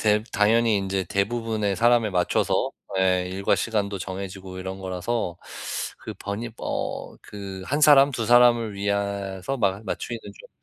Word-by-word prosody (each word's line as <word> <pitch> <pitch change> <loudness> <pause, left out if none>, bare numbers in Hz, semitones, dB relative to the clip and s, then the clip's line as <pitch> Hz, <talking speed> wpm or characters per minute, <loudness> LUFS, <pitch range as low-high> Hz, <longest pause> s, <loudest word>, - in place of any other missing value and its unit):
대 105 0 +3
당연히 110 +1 +3
이제 95 0 -1
대부분의 105 0 -1
사람에 120 -1 +4
맞춰서 90 -1 +1 0.3
예 90 -1 +2
일과 95 +2 +1
시간도 105 -3 -1
정해지고 95 0 -6
이런 95 +1 -5
거라서 95 0 -2 0.6
그 - - -8
번이 105 +4 -4
뭐 - - -4
그 95 -2 -8
1 145 +3 0
사람, 145 -2 +7
2 115 -2 -2
사람을 120 -3 +5
위해서 100 +2 -2
마 100 -2 +1
맞추기는 115 +3 -4
좀 - - -12
100 Hz, 280 characters per minute, -25 LUFS, 95-115 Hz, 0.6 s, 사람